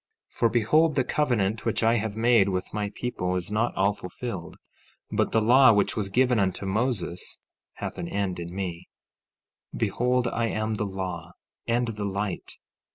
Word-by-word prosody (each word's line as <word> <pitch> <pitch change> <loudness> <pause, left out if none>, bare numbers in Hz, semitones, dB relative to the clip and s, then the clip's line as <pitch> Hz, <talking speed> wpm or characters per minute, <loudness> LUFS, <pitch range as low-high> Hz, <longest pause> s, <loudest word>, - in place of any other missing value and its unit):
15:8 - - -22
For 115 - +4
behold, 140 +8 +3
the 130 - +3
covenant 115 -7 0
which - - 0
I 115 +1 +4
have 110 -1 -3
made 115 -3 +4
with 90 -1 -3
my 105 -1 -1
people 90 -7 -2
is 90 +2 -3
not 110 +3 0
all 100 +2 +2
fulfilled; 90 -2 -6 0.6
but - - +1
the 115 - +3
law 125 +1 +7
which 100 -1 +1
was 105 -3 -2
given 125 +2 +3
unto 95 0 0
Moses 95 -4 -1 0.4
hath - - -6
an 85 - -3
end 95 -2 -2
in 85 0 -6
me. 90 -2 -5 0.9
15:9 - - -6
Behold, 125 0 +1
I 115 0 0
am 110 0 -1
the 105 -1 -2
law, 90 -3 -5 0.3
and 120 0 +1
the 105 -2 -4
light. 100 0 -3
105 Hz, 175 wpm, -26 LUFS, 95-120 Hz, 0.9 s, law